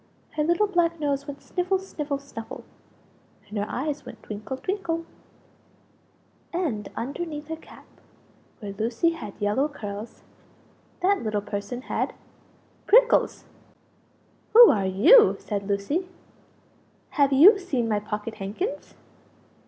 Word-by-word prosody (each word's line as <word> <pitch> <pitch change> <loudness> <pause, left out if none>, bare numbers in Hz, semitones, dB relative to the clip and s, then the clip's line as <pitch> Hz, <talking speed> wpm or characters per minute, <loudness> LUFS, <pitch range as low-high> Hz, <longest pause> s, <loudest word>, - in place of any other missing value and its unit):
Her 300 - -1
little 345 +6 +3
black 345 -4 +1
nose 285 -1 -1
went 280 -1 -8
sniffle, 365 +1 0
sniffle, 300 -7 -4
snuffle, 275 -5 -9 0.8
and 210 - -10
her 205 - -2
eyes 290 +2 -3
went - - -12
twinkle, 215 +5 -6
twinkle; 335 -1 -3 1.5
and 290 - -2
underneath 295 +3 -5
her 320 - -2
cap 320 - -16 0.7
where 200 -2 -6
Lucie 230 - 0
had 325 -11 -8
yellow 210 +8 +1
curls 210 -6 -8 0.8
that 390 +2 +2
little 215 -2 -1
person 205 +5 -5
had - - -2 0.7
PRICKLES! - - +4 1.1
"Who 470 0 +10
are 195 -3 0
you?" 240 - +6
said 200 -2 -4
Lucie. 205 - -1 1.0
"Have 280 -2 +3
you 355 +10 +8
seen 270 -11 -1
my 210 -2 +1
pocket 210 +1 -5
handkins?" 215 - -5
280 Hz, 120 wpm, -25 LUFS, 210-345 Hz, 1.5 s, Who